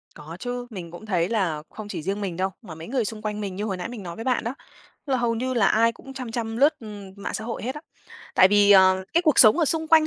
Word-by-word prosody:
Có 155 +2 -9
chứ, 245 0 -4
mình 180 -7 -8
cũng 175 +6 -10
thấy 180 -4 0
là 175 -9 -1
không 215 -1 -9
chỉ 185 - -5
riêng 195 +5 -3
mình 180 -4 -4
đâu, 190 +1 0
mà 175 -8 -10
mấy 160 +1 -9
người 245 -3 0
xung 215 0 -5
quanh 210 0 -3
mình 195 -3 -4
như 205 - -4
hồi 190 -3 -3
nãy 180 - -5
mình 230 -5 -8
nói 170 -1 -7
với 225 - -6
bạn 255 -2 0
đó, 235 +3 -3 0.5
là 270 - +1
hầu 240 -2 0
như 255 +2 -2
là 215 -5 +3
ai 230 +3 +3
cũng 270 +3 -12
chăm 255 -3 -6
chăm 225 -1 -3
lướt, 290 +5 +4
ừm, 205 -3 -9
mạng 200 - -5
xã 220 - -4
hội 230 -1 -5
hết 260 +4 -3
á. 300 - -7 0.5
Tại 185 - +7
vì, 205 0 +5
à, 190 -1 +7 0.2
cái 340 - +3
cuộc 310 -5 +3
sống 215 +6 +8
ở 325 - +4
xung 320 +2 -1
quanh 315 -1 +6
215 Hz, 290 wpm, -24 LUFS, 190-245 Hz, 0.5 s, sống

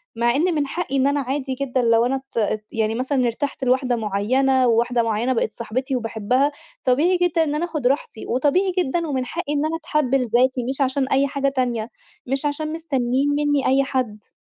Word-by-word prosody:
مع 235 +2 +2
إن 340 +3 +1
من 290 -2 0
حقي 305 -4 -3
إن 270 +1 +3
أنا 285 +1 +1
عادي 265 0 -2
جدًا 260 -2 0
لو 230 0 +3
أنا 265 +2 0
ات 265 -2 -8
ات 215 -1 0
يعني 220 0 0
مثلًا 255 +1 0
ارتحت 265 +3 -3
لواحدة 255 -1 +2
معيّنة، 250 +5 +1
وواحدة 235 +1 +2
معيّنة 230 +3 0
بقت 225 -2 0
صاحبتي 255 +4 -3
وباحبها، 245 +4 0 0.3
طبيعي 305 +9 +3
جدًا 345 -2 +2
إن 295 -1 -1
أنا 330 +3 0
اخد 305 -7 -1
راحتي 265 -4 -2
وطبيعي 300 +10 +1
جدًا 335 +1 0
ومن 260 -3 -1
حقي 310 +2 -4
إن 295 +1 0
أنا 320 - -1
اتحب 300 -5 0
لذاتي 250 0 +2
مش 270 +1 -2
عشان 265 0 +1
أي 275 +1 +2
حاجة 275 0 -1
تانية، 245 -4 -1 0.4
مش 270 +3 -2
عشان 305 +2 -2
مستنين 275 -4 0
منّي 290 -1 +1
أي 270 +1 +4
حد. 250 -7 -3
265 Hz, 195 wpm, -22 LUFS, 240-290 Hz, 0.4 s, أي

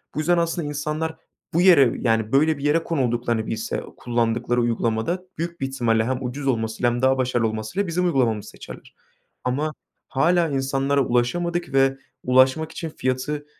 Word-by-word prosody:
Bu - - -2
yüzden 175 +3 +2
aslında 170 -2 -1
insanlar 150 +2 -3 0.4
bu 170 - +3
yere, 155 -10 +6
yani, 115 -2 +1
böyle, 155 +3 +3
bir 140 - -8
yere 155 +3 +2
konulduklarını 120 -7 -1
bilse 110 0 -3
kullandıkları 120 0 0
uygulamada 115 +9 -1
büyük 170 -1 -5
bir 135 - 0
ihtimalle 120 -4 +1
hem 130 +1 -2
ucuz 135 +3 -4
olmasıyla 115 0 0
hem 120 - -3
daha 130 0 +3
başarılı 125 -3 +1
olmasıyla 110 - -3
bizim 180 +2 0
uygulamamızı 115 - +1
seçerler. - - -12 0.5
Ama 145 +5 -1 0.4
hâlâ 170 +4 +2
insanlara 135 0 0
ulaşamadık 170 +6 -1
ve 135 0 +3 0.3
ulaşmak 130 +5 +3
için 165 - -5
fiyatı 130 +3 -2
135 Hz, 155 wpm, -23 LUFS, 120-160 Hz, 0.5 s, yere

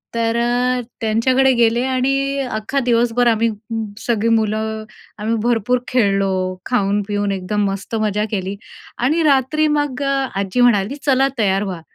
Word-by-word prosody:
तर 230 0 0
अ, 245 +1 +1 0.2
त्यांच्याकडे 255 +4 +3
गेले 235 0 +2
आणि 275 +2 0
अख्खा 220 +6 -2
दिवसभर 240 0 +2
आम्ही 230 0 +2 0.2
म 225 -1 -2 0.2
सगळी 230 -1 0
मुलं 220 0 -1 0.4
आम्ही 220 +2 -1
भरपूर 240 +1 +1
खेळलो, 195 -5 +1
खाऊन-पिऊन 205 -2 0
एकदम 195 +2 -2
मस्त 195 +3 -5
मज्जा 210 -1 0
केली 195 -1 -3 0.4
आणि 305 +7 +1
रात्री 290 +1 +2
मग 290 -3 -1
अ, 275 -1 0
आजी 195 +5 0
म्हणाली, 235 0 +3
"चला, 270 -1 +3
तयार 195 -1 +2
व्हा." 185 -4 -5
230 Hz, 140 wpm, -19 LUFS, 205-255 Hz, 0.4 s, त्यांच्याकडे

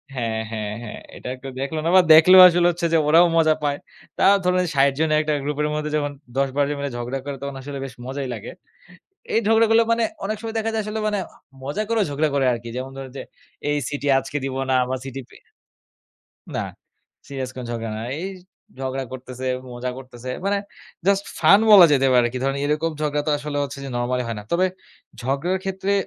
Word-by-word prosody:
হ্যাঁ, 115 -2 -2
হ্যাঁ, 105 -1 -4
হ্যাঁ 110 - -7 0.2
এটা - - -9
একটু 135 +1 -10
দেখলো 155 +3 -3
না - - +2
বা 185 - +9
দেখলেও 185 +4 +9
আসলে 175 0 +3
হচ্ছে 170 0 -3
যে - - +6
ওরাও 170 +3 +6
মজা 155 -1 +5
পায়। 145 -1 0 0.4
তাও 200 +1 +5
ধরুন 180 0 +3
৬০ 140 0 +4
জনের 155 -1 +2
একটা 155 0 -1
গ্রুপের 150 +1 -1
মধ্যে 150 0 -3
যখন 145 -1 -2 0.3
১০-১২ 140 +1 +1
জন 145 - -3
মিলে 140 -2 -3
ঝগড়া 125 +3 -3
করে 140 -1 -4
তখন 140 -1 -5
আসলে 140 0 -6
বেশ 130 - -8
মজাই 135 0 -4
লাগে। 110 0 -7 0.8
এই - - +4
ঝগড়াগুলো 225 0 +5
মানে 230 0 +2 0.2
অনেক 215 +1 -2
সময় 225 0 -6
দেখা 225 0 -1
যায় 220 -1 -1
আসলে 215 +1 -3
মানে 205 -2 0 0.4
মজা 150 +11 -2
করেও 225 -3 +2
ঝগড়া 150 +2 +1
করে 135 -1 +2
আরকি। 120 0 -6
যেমন 130 +1 -5
ধরুন 135 -1 -8
যে - - -5 0.5
এই 145 - +1
CT 145 -1 -5 0.2
আজকে 135 +2 -5
দিব 135 -1 -4 0.2
না - - +3
বা 130 - 0
CT 135 0 -7 0.2
এ - - -21 1.2
না - - -1 0.6
সিরিয়াস 135 -2 -4
কোনো 125 -2 -6
ঝগড়া 115 -1 -4
না। - - -5 0.2
এই 190 - -3 0.5
ঝগড়া 135 0 -3
করতেছে, 130 0 -7 0.3
মজা 125 +1 -4
করতেছে। 125 -1 -9 0.2
মানে 200 0 +1 0.5
জাস্ট 200 0 +3
ফান 200 +2 +6
বলা 195 -4 +10
যেতে 135 -1 +3
পারে 125 -1 +5
আরকি। 125 +2 -4
ধরেন 135 0 0
এরকম 155 +2 0
ঝগড়া 150 -1 0
তো - - +3
আসলে 145 0 -4
হচ্ছে 140 0 -7
যে - - -5
নরমালী 125 +1 -1
হয় 115 - -3
না। - - -13
তবে 185 +2 +3 0.6
ঝগড়ার 140 +9 -1
ক্ষেত্রে 190 +1 -2
145 Hz, 205 wpm, -22 LUFS, 130-175 Hz, 1.2 s, বলা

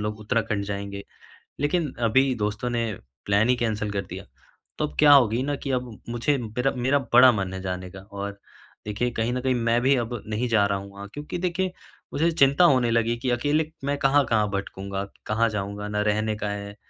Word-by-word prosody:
लोग 105 0 -3
उत्तराखंड 105 -2 -1
जाएँगे। 100 0 -5 0.6
लेकिन 150 -1 0 0.2
अभी 130 +3 +3
दोस्तों 105 +4 -2
ने 115 -2 -1 0.3
प्लान 100 +4 +3
ही 125 - +5
कैंसल 110 -3 -1
कर 100 -1 -1
दिया। - - -7 0.6
तो 150 - +1
अब - - -14
क्या 150 -1 +7
होगी 125 -2 +4
न 145 0 -1
कि 135 - -2
अब 125 -4 -3
मुझे 120 +4 0
मेरा 125 +3 -1
मेरा 135 +4 +2
बड़ा 125 +1 +9
मन 95 -4 -2
है 95 - -5
जाने 90 -1 -4
का 95 - -10
और 100 0 -5 0.5
देखिए 105 +4 -1
कहीं 115 +1 -1
न 125 - -1
कहीं 130 0 +1
मैं 115 0 +2
भी 135 +2 +4
अब 120 0 -2 0.2
नहीं 110 +4 -1
जा 105 -3 +4
रहा 100 -1 0
हूँ 100 0 -10
वहाँ 100 0 -9
क्योंकि 150 +4 -5
देखिए 185 +1 -1 0.4
मुझे 165 +4 +2
चिंता 140 +1 +4
होने 125 -6 +4
लगी 115 0 +2
कि 125 +1 -2
अकेले 145 +6 +1 0.2
मैं 145 0 0
कहाँ-कहाँ 125 -7 +3
भटकूँगा? 100 0 -4 0.2
कहाँ 110 +2 +2
जाऊँगा? 105 0 -4
ना 105 0 -1
रहने 105 +1 0
का 105 -1 -3
है। 100 0 -6
115 Hz, 200 wpm, -25 LUFS, 105-130 Hz, 0.6 s, बड़ा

